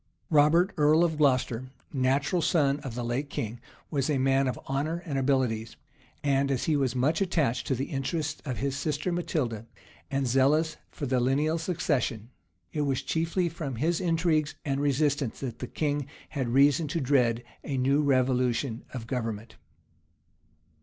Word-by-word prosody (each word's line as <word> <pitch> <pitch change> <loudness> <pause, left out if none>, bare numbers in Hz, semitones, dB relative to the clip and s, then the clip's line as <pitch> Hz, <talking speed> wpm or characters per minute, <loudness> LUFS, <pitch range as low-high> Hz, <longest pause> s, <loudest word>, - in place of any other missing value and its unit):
Robert, 155 +5 +4
earl 155 +2 +5
of 160 -3 0
Glocester, 130 -3 +2 0.3
natural 140 +6 +1
son 150 -4 +2
of 130 -6 -7
the 120 - -3
late 130 +5 -2
king, 115 -2 -4 0.3
was 140 -2 0
a 145 - +2
man 135 +1 +2
of 130 - -2
honor 155 +6 -2
and 150 -5 -3
abilities; 130 -5 0 0.5
and 140 -1 +2
as 135 -3 0
he 155 - +2
was 130 -3 0
much 145 +7 +1
attached 155 -10 0
to 135 - +1
the 130 +3 -2
interests 150 +2 -2
of 130 -5 -4
his 140 -1 -1
sister 150 +4 -1
Matilda, 125 -10 -2 0.4
and 135 -1 0
zealous 145 +5 +2
for 145 - -5
the 130 -1 +1
lineal 145 +6 +1
succession, 140 - -1 0.4
it 150 - -1
was 140 -3 0
chiefly 165 +2 0
from 155 -6 -5
his 165 +9 0
intrigues 165 -3 +1
and 140 -1 0
resistance 145 -2 +1
that 125 -4 -5
the 125 - -4
king 145 -1 -1 0.2
had 135 -5 -2
reason 140 +5 +4
to 155 +4 -1
dread 125 -4 +2 0.2
a 140 - -3
new 135 +3 +3
revolution 130 -3 +1
of 115 -3 -5
government. 115 -2 -4
140 Hz, 160 wpm, -28 LUFS, 130-155 Hz, 0.5 s, earl